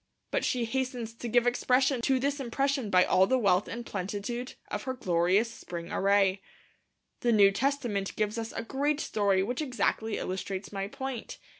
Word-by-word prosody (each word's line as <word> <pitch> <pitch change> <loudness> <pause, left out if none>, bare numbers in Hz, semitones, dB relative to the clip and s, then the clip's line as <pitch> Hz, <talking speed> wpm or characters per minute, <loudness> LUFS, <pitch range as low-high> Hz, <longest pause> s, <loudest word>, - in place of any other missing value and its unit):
But - - 0
she 245 -2 0
hastens 250 -2 -3
to 235 +1 -6
give 240 +1 +3
expression 250 +1 +2
to 265 +2 +2
this 280 +2 -1
impression 270 -1 -1
by 180 -2 +5
all 190 +1 +4
the 260 - +3
wealth 200 -5 +3
and 235 +1 -6
plenitude 205 +6 -4 0.2
of 210 - -2
her 260 -1 -2
glorious 185 +1 +2
spring 170 -5 -7
array. 195 -1 +3 0.8
The 240 - +2
New 200 -3 +6
Testament 235 -4 -1
gives 215 +1 -1
us 225 0 -4
a 225 - -4
great 285 +5 0
story 200 -8 +1
which 245 +8 -2
exactly 225 -5 -1
illustrates 190 +1 -4
my 195 0 -2
point. 265 +1 -6
230 Hz, 170 wpm, -29 LUFS, 200-255 Hz, 0.8 s, New